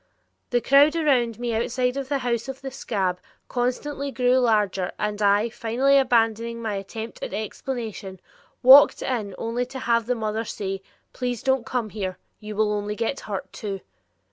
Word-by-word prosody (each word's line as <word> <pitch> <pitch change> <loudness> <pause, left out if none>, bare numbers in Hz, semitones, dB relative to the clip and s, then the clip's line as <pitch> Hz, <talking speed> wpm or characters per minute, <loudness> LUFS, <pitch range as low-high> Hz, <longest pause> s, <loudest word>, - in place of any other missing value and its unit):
The 245 -1 +1
crowd 285 +5 +5
around 255 -8 +2
me 240 -1 -2
outside 250 +3 0
of 275 -1 -4
the 285 - +1
house 235 -1 -1
of 270 0 -7
the 270 0 -6
"scab" 195 -8 -2 0.3
constantly 270 +3 -2
grew 255 -1 +2
larger 210 -6 +1
and 210 0 -2
I, 205 +2 +3
finally 240 +5 +1
abandoning 230 -2 +1
my 220 -2 -3
attempt 220 +3 -6
at - - -4
explanation, 215 -3 -5 0.4
walked 265 +3 +8
in 215 -7 -2
only 240 +2 -2
to 265 +1 -8
have 235 -3 +1
the 250 - +1
mother 220 0 -2
say: 195 -3 -4 0.3
"Please 245 -3 -3
don't 265 -3 +1
come 235 -4 -2
here. 190 -4 -4 0.2
You 210 0 -7
will 210 0 +2
only 210 0 -2
get 230 +5 -2
hurt, 200 -3 -6
too." 195 -3 -5
230 Hz, 170 wpm, -24 LUFS, 210-255 Hz, 0.4 s, walked